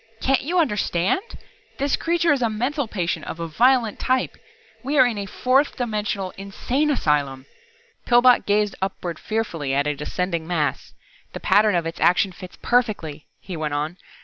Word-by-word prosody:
"Can't 270 0 +2
you 340 +7 -2
understand! 210 - +1 0.6
This 280 0 +1
Creature 335 -1 +2
is 275 - -2
a 235 - +2
mental 250 +5 -1
patient 180 -5 -3
of 165 - -6
a 165 - -3
violent 235 +5 +2
type. 255 0 0 0.5
We 280 +3 -2
are 260 - +7
in 230 -4 -1
a 200 - -4
fourth 260 +8 +1
dimensional 210 -5 -2
insane 245 +9 -1
asylum!" 145 - 0 0.6
Pillbot 245 0 +5
gazed 210 0 +2
upward 180 -3 -4
fearfully 165 -11 -2
at 140 +1 +1
a 150 - 0
descending 170 +2 -3
mass. 160 -4 -2 0.4
"The - - -5
pattern 210 -1 +3
of 170 -1 0
its 165 - -5
action 185 +2 +3
fits 180 0 -11
perfectly," 205 -12 0
he 185 - -7
went 155 -2 -2
on. 155 +4 -3
205 Hz, 165 wpm, -23 LUFS, 170-250 Hz, 0.6 s, are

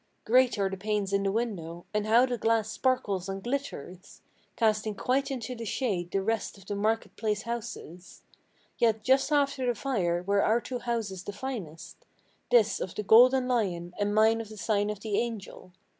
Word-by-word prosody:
Great 250 +1 +4
are 200 -1 +1
the 195 - -4
panes 205 0 -2
in 200 - +2
the 195 0 0
windows; 180 -7 -3
and 210 0 0
how 235 +3 +6
the 250 -1 -2
glass 225 -2 +1
sparkles 200 -8 0
and 195 0 -5
glitters, 240 - -5 0.3
Casting 215 -1 +1
quite 265 +6 0
into 255 -2 -4
the 230 -2 -7
shade 200 -6 -2
the 195 +1 -1
rest 220 -1 -2
of 195 - -16
the 205 - -4
market 220 +3 -1
place 215 -1 -1
houses! 210 -6 -7 0.6
Yet 220 -2 +2
just 265 +4 +3
after 280 -3 +1
the 245 - +1
fire 180 -9 -1
were 200 +1 +2
our 225 +2 +3
two 250 +1 -5
houses 225 -6 -3
the 205 - -6
finest, 205 - -7 0.5
This 220 -4 +4
of 185 - -5
the 210 - -3
Golden 250 +5 +6
Lion, 180 -8 -1
and 205 0 0
mine 220 +1 +4
of 220 - -9
the 215 - -10
sign 205 0 0
of 210 -1 -5
the 210 -2 0
Angel. 220 -5 -5
215 Hz, 190 wpm, -28 LUFS, 195-240 Hz, 0.6 s, how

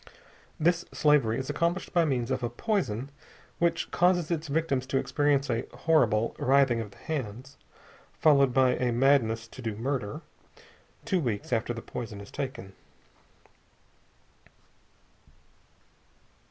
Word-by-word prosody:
This 175 +2 +2
slavery 140 -7 +3
is 130 - -4
accomplished 170 +3 -1
by 170 -2 +4
means 130 -4 -1
of 130 0 -1
a 120 - -1
poison 135 - -2 0.5
which 170 -1 0
causes 175 -2 +2
its 160 -1 -2
victims 140 -3 -1
to 135 - 0
experience 145 0 +1
a 115 0 -2
horrible 115 -9 +2
writhing 135 -3 +3
of 110 - -7
the - - -19
hands, 135 -2 -5 0.6
followed 140 -4 +5
by 130 0 +4
a 125 -1 0
madness 115 -3 +2
to 130 - -11
do 110 -3 -3
murder, 120 -2 -3 0.8
two 185 - +1
weeks 120 -5 -2
after 115 +1 0
the 115 -1 -6
poison 115 -4 -6
is 100 - -11
taken. 130 -9 -6
130 Hz, 125 wpm, -28 LUFS, 115-155 Hz, 0.8 s, followed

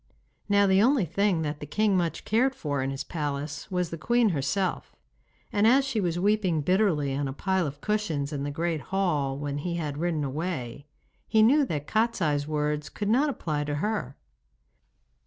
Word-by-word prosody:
Now 200 0 +5
the 190 0 +4
only 250 -3 +3
thing 180 0 +1
that 150 -1 -3
the 150 - -7
king 210 +4 +1
much 170 -3 -1
cared 255 +5 +2
for 145 -3 -2
in 135 - -1
his 135 0 -4
palace 145 -2 -4
was 180 -2 -1
the 165 - -5
queen 235 +4 +3
herself, 175 +5 -2 0.6
and 210 +1 +4
as 265 +3 +5
she 245 -6 -1
was 175 -2 -1
weeping 190 -4 +1
bitterly 165 -5 +2
on 140 +1 -1
a 135 - -4
pile 190 +2 0
of 145 +1 -8
cushions 165 -9 -1
in 140 - -3
the 145 - -2
great 165 +1 -2
hall 150 -9 0
when 145 0 -3
he 170 +3 -3
had 150 -4 -3
ridden 165 -3 0
away, 140 -2 -4 0.4
he 220 -1 +4
knew 285 +7 +5
that 150 -6 -3
Kostiei's 170 -11 0
words 150 -1 -1
could 205 -1 -3
not 270 +7 +3
apply 155 - -2
to 145 0 -2
her. 180 - -2
170 Hz, 185 wpm, -27 LUFS, 145-205 Hz, 0.6 s, Now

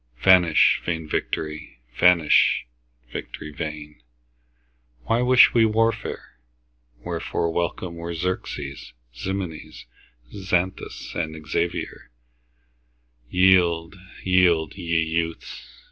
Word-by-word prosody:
Vanish 90 -4 +5
vain 80 -2 -3
victory! 75 -2 -4 0.2
vanish, 85 0 +4 0.5
victory 75 - -7
vain! 75 -3 -7 1.0
Why 115 - +1
wish 125 0 +6
we 115 - +4
warfare? 110 - -1 0.7
Wherefore 85 - -2
welcome 85 0 -3
were 85 0 -5
Xerxes, 80 -7 -5 0.2
Ximenes, 90 +4 -6 0.5
Xanthus, 95 -2 -3 0.3
Xavier? 85 +1 -3 1.2
Yield, 90 -1 +3 0.3
yield, 90 -4 +3
ye 85 -3 -1
youths! 80 0 -4
85 Hz, 80 wpm, -23 LUFS, 80-95 Hz, 1.2 s, wish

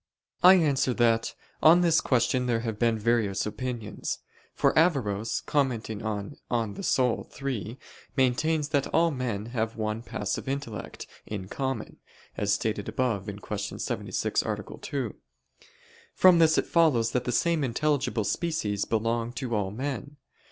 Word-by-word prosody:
I 185 +1 +9
answer 140 -7 +2
that, 115 -1 +2 0.3
On 170 +3 +7
this 165 -2 +4
question 125 0 +1
there 115 -2 +1
have 110 -3 -4
been 115 -2 +2
various 110 -3 +1
opinions. 115 +1 -4 0.4
For - - +2
Averroes, 115 - +1
commenting 120 -7 -1
on 105 +4 -4 0.4
De - - -7
Anima 125 -3 +1
iii, 125 -4 -3 0.4
maintains 145 +4 +2
that 140 -3 +1
all 165 +1 +3
men 120 -7 -3
have 115 -1 -1
one 110 0 -2
passive 105 +1 -3
intellect 135 -6 -5 0.2
in 100 -3 -5
common, 135 -3 -3 0.4
as 105 -1 0
stated 105 0 -1
above 110 -3 -1 0.2
(Q. 105 -1 -4
76, - - -1
A. - - -2 0.2
2). 130 -6 -3 1.0
From 180 -2 +6
this 160 -1 +5
it - - +2
follows 135 -9 +3
that 125 -1 -1
the 125 - 0
same 165 +4 +1
intelligible 135 -2 0
species 105 - -1
belong 115 +1 0
to 125 -2 -4
all 100 -2 0
men. 140 +5 -5
120 Hz, 140 wpm, -27 LUFS, 110-140 Hz, 1.0 s, I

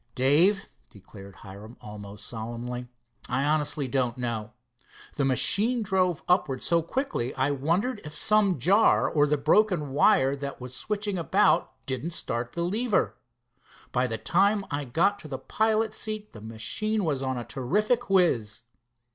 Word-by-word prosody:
"Dave," 165 +10 +3 0.2
declared 100 0 -14
Hiram 105 +4 -11
almost 105 -1 -9
solemnly, 120 +2 -6 0.4
"I 130 +2 0
honestly 150 -1 0
don't 125 -2 -1
know. 115 -3 -4 0.6
The 140 - -1
machine 220 - +3
drove 185 -5 0
upwards 150 -8 +1
so 170 0 +3
quickly 170 - -3
I 145 - +1
wondered 170 - -1
if 150 -1 -9
some 205 +1 +3
jar 195 - +4
or 150 -1 +2
the 150 +1 +1
broken 155 0 +2
wire 135 0 +3
that 140 0 -6
was 125 0 -7
switching 205 - -2
about 165 - +1
didn't 135 +6 -3
start 120 -6 -3
the 170 - -2
lever. 210 +5 0 0.8
By 125 0 +1
the 110 -2 -3
time 200 - +2
I 145 0 -2
got 175 +11 +1
to 155 - -9
the 135 -3 -5
pilot's 220 +3 0
seat 215 -1 -3
the 105 - -11
machine 190 - -2
was 140 -4 -1
on 130 -1 -2
a 120 - -5
terrific 210 - -1
whiz." 125 - +1
145 Hz, 150 wpm, -26 LUFS, 125-200 Hz, 0.8 s, jar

